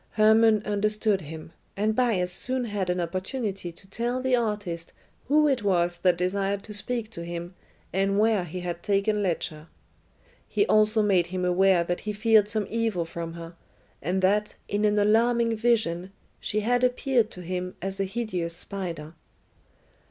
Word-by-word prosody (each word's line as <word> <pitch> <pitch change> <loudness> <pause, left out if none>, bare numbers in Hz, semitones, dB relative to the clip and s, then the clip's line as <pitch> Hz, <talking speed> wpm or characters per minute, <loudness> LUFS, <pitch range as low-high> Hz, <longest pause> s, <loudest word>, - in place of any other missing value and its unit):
Hermon 220 0 +5
understood 210 0 0
him, 160 +1 -9 0.3
and 215 +2 +1
Bias 215 -8 +1
soon 255 +6 0
had 205 -4 -2
an 180 0 0
opportunity 190 +2 -3
to 180 +4 -19
tell 240 +5 -2
the 260 0 +2
artist 205 -8 -3 0.3
who 300 +2 +4
it 265 -4 +1
was 175 -3 +1
that 180 0 +2
desired 195 +2 -1
to 210 - -9
speak 225 +1 -3
to 170 - -7
him 170 +1 -6 0.4
and 195 +1 +1
where 215 -2 +3
he 180 +2 -6
had 175 -1 -4
taken 205 +1 +1
Ledscha. 160 -4 -2 0.8
He 410 - +1
also 215 - +4
made 185 -4 +3
him 185 0 -2
aware 180 0 +4
that 175 +1 -2
he 210 - -4
feared 215 -1 +4
some 215 -1 0
evil 225 -6 0
from 165 0 -6
her, 170 0 -9 0.5
and 185 +5 -1
that, 210 +2 +2
in 205 +1 0
an 210 0 +2
alarming 230 +2 +3
vision, 210 -6 +1 0.3
she 215 - -1
had 245 +3 +1
appeared 250 -2 +2
to 180 - -9
him 180 +1 -4
as 195 +1 -4
a 195 - +1
hideous 185 -6 -3
spider. 170 -4 -6
200 Hz, 165 wpm, -26 LUFS, 180-220 Hz, 0.8 s, Hermon